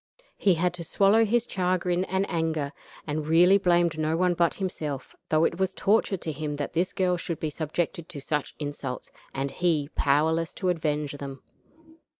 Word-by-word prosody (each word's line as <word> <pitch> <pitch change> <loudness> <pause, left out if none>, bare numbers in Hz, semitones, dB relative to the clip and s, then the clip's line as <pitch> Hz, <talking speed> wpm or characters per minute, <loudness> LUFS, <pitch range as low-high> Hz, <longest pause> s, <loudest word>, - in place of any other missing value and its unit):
He 190 -3 +3
had 175 +2 +1
to 175 -1 -6
swallow 200 +6 +4
his 235 +2 +2
chagrin 180 -1 0
and 190 +1 0
anger, 160 -4 -1 0.3
and 150 0 -3
really 175 +5 +6
blamed 175 -4 +2
no 155 +1 +1
one 180 0 +3
but 170 -1 +1
himself, 150 -8 -4
though 155 0 +3
it 170 - -1
was 190 0 0
torture 205 -1 +2
to 165 - -4
him 150 0 -4
that 145 -1 -4
this 175 +3 +1
girl 180 -1 +1
should 170 -2 -4
be 155 - -2
subjected 160 +2 -3
to 145 - -7
such 150 +1 -2
insults, 145 -3 -5 0.2
and 135 0 -3
he 160 -5 +1
powerless 160 +3 +2
to 185 - -1
avenge 150 -4 -1
them. 135 -1 -7
165 Hz, 175 wpm, -27 LUFS, 150-180 Hz, 0.3 s, really